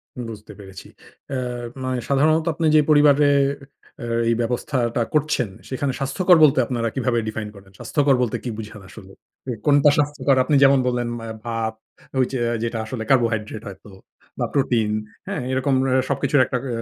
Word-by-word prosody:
হুম, 125 - -5
বুঝতে 105 -1 -11
পেরেছি। 95 -1 -11 0.4
অ্যা 135 - -3 0.5
মানে 130 0 -2
সাধারণত 155 +3 +3
আপনি 165 +2 -2
যে - - +7
পরিবারে 145 -1 +5 0.7
অ্যা - - -6 0.2
এই 115 - +2
ব্যবস্থাটা 120 0 -1
করছেন, 150 -7 +1 0.2
সেখানে 135 +1 -2
স্বাস্থ্যকর 175 +7 +3
বলতে 140 -3 +5
আপনারা 115 -1 -2
কিভাবে 125 -3 0
define 110 -1 -5
করেন? 95 -1 -16
স্বাস্থ্যকর 145 -2 +2
বলতে 120 -3 -1
কি 125 - -4
বুঝান 105 -1 -8
আসলে? 95 -3 -13 0.4
এ - - 0
কোনটা 145 0 +5
স্বাস্থ্যকর? 145 -2 +1
আপনি 145 +3 +1
যেমন 135 0 +6
বললেন 120 -1 -1
ম্যা 115 - -8 0.2
ভাত, 115 -1 -2 0.5
ঐযে 130 0 0 0.2
যেটা 115 0 -2
আসলে 110 0 -5
কার্বোহাইড্রেট 115 -4 +1
হয়তো 100 +1 -11 0.5
বা - - +1
প্রোটিন। 120 -6 +1 0.4
হ্যাঁ? - - -3
এরকম 130 +1 0
অ্যা 130 0 +2
সবকিছুর 140 0 +2
একটা 125 - -2
অ্যা 120 -4 -3
125 Hz, 165 wpm, -22 LUFS, 115-140 Hz, 0.7 s, যে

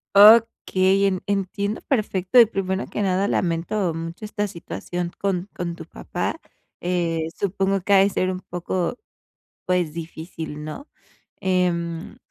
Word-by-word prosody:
Okey, 200 -3 +6
en 185 -2 -1
entiendo 200 +1 -1
perfecto 210 -3 +2
y, 235 - +10
primero 195 -2 -2
que - - -4
nada, 195 0 +1
lamento 170 +1 0
mucho 165 +5 -6
esta 210 0 -2
situación 175 -1 -5
con 195 -1 -1
con 170 -2 -3
tu 160 -2 -9
papá. 175 - -4 0.4
Eh, 170 -2 0
supongo 195 0 0
que 200 +2 +1
ha - - +8
de 195 +1 +5
ser 185 0 0
un 185 0 -3
poco, 180 +5 -3 0.7
pues, 180 -4 +1
difícil, 160 -2 -7
¿no?, 155 - -7 0.5
em, 175 0 0
185 Hz, 135 wpm, -23 LUFS, 170-200 Hz, 0.7 s, y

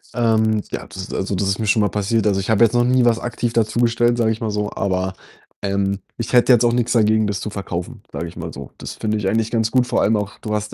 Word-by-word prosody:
Ähm, 110 -2 +2
ja, - - -4
das - - -12
ist - - -8
also, 95 0 -2
das 100 +1 -1
ist 100 +2 0
mir 110 - -1
schon 105 0 +3
mal 105 - +2
passiert. 105 +2 0
Also, 95 -1 +2
ich 100 - -4
habe 110 +1 +4
jetzt 115 +1 +4
noch 120 - +3
nie 125 0 +3
was 115 -1 +3
aktiv 120 -1 -3
dazu 115 0 +1
gestellt, 120 0 +2
sage 110 -1 +2
ich 110 +2 -4
mal 110 -2 -1
so, 105 0 -2
aber, 95 -1 -1 0.5
ähm, 100 0 0 0.2
ich 115 +1 -5
hätte 125 +1 +5
jetzt 120 0 +4
auch 120 - +3
nix 120 -1 0
dagegen, 110 -1 +3
das 100 -2 -2
zu 105 - -4
verkaufen, 100 +3 -6
sage 85 - -4
ich 85 - -11
mal 85 -1 -6
so. 70 -1 -9
Das - - -7
finde 110 0 -2
ich 100 -2 -2
eigentlich 110 +2 +1
ganz 115 -1 0
gut, 125 0 +2
vor - - +1
allem 110 +2 +3
auch, 100 -1 -4
du 105 -2 -4
hast 105 0 -3
110 Hz, 285 wpm, -20 LUFS, 100-115 Hz, 0.5 s, hätte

